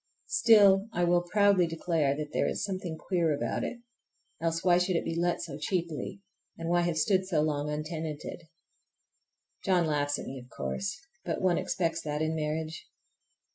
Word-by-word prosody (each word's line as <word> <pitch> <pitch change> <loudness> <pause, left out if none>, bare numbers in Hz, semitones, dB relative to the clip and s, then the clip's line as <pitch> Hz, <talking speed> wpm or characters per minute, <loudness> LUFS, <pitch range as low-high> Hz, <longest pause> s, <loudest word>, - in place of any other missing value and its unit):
Still 205 - +5
I 175 - +1
will 175 0 +4
proudly 200 -4 +4
declare 160 -4 0
that 150 -1 -5
there - - +2
is - - -2
something 185 -4 -3
queer 170 -2 0
about - - -2
it. 240 - -5 0.6
Else, 165 0 0
why 175 -1 +5
should 180 0 +1
it - - 0
be 165 - -2
let 175 +1 0
so 145 -3 -6
cheaply? 170 +3 -3 0.4
And 165 0 -4
why 175 0 +3
have 170 -2 0
stood 185 +4 +2
so 165 -5 +2
long 150 -1 0
untenanted? 155 +1 -4 1.2
John 180 -4 +3
laughs 145 -2 0
at - - -6
me, 135 0 -6
of 125 0 -14
course, 200 - -3 0.3
but - - -2
one 180 -2 +3
expects 165 -2 -1
that 150 0 -2
in 155 0 0
marriage. 155 0 -3
165 Hz, 175 wpm, -29 LUFS, 155-185 Hz, 1.2 s, Still